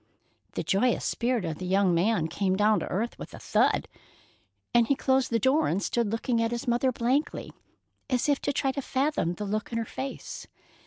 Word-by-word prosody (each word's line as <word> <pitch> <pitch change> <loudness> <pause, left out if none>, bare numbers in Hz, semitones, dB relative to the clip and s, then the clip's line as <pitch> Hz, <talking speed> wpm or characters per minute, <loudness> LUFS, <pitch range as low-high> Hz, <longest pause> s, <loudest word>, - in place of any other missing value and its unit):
The - - -2
joyous 230 +5 +1
spirit 240 -4 0
of 160 -2 -4
the 185 - -4
young 190 -1 +3
man 175 -1 +2
came 190 +2 0
down 210 +2 +3
to - - -4
earth 225 +6 -2
with - - -8
a - - -10
thud, - - +2 0.9
and 235 -1 +5
he 280 - +3
closed 265 -1 +1
the 230 - +2
door 265 +7 +3
and 180 - +1
stood 225 +1 -1
looking 230 +1 0
at 230 - +1
his 240 +3 -4
mother 245 +2 +2
blankly, 255 +6 -1 0.6
as 255 0 +1
if 285 -2 +2
to - - 0
try 270 -1 0
to 280 - -4
fathom 265 - 0
the 210 - -5
look 215 +3 -3
in 230 - -2
her 230 - -1
face. 265 +5 -6
235 Hz, 205 wpm, -27 LUFS, 200-260 Hz, 0.9 s, and